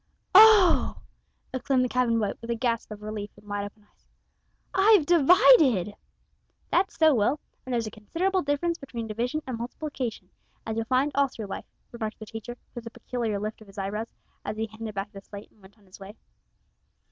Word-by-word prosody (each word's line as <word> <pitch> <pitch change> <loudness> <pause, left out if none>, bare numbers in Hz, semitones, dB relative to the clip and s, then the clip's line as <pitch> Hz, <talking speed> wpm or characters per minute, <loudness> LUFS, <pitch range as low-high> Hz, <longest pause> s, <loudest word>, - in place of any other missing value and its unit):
"Oh!" 410 -4 +7 0.6
exclaimed 260 0 +1
the - - 0
cabin 245 -2 +1
boy, 210 -3 0
with 230 - -9
a 235 - 0
gasp 230 -1 -1
of 210 -1 -9
relief 210 -1 -5
and 205 0 -18
wide 205 0 -3
open 205 +1 -12
eyes, 205 - -35 0.7
"I've 390 -4 +5
divided!" 305 - +5 0.8
"That's 375 +2 +1
so, 315 -2 +5
Will, 245 +5 +1 0.2
and 260 - -8
there's 235 -2 0
a 215 - -6
considerable 360 - -1
difference 310 +4 -1
between 240 -4 -6
division 240 +8 -3
and 250 -3 -5
multiplication, 250 -1 -5 0.3
as 220 - -3
you'll 225 0 -2
find 260 +4 +1
all 280 0 +3
through 225 -4 -8
life," 195 - -6 0.3
remarked 225 -2 -5
the 215 - -9
teacher, 225 +3 -8 0.2
with 235 -1 -8
a - - -4
peculiar 230 -2 -3
lift 215 +2 -5
of 215 - -14
his 195 - -17
eyebrows, 210 +3 -4 0.3
as 210 +1 -5
he 220 - -1
handed 220 -1 -8
back 200 +1 -4
the 195 -2 -10
slate 200 +1 -11
and 215 - -28
went 195 +3 -18
on 205 - -25
his 185 +1 -15
way. 195 +2 -10
230 Hz, 195 wpm, -26 LUFS, 210-280 Hz, 0.8 s, Oh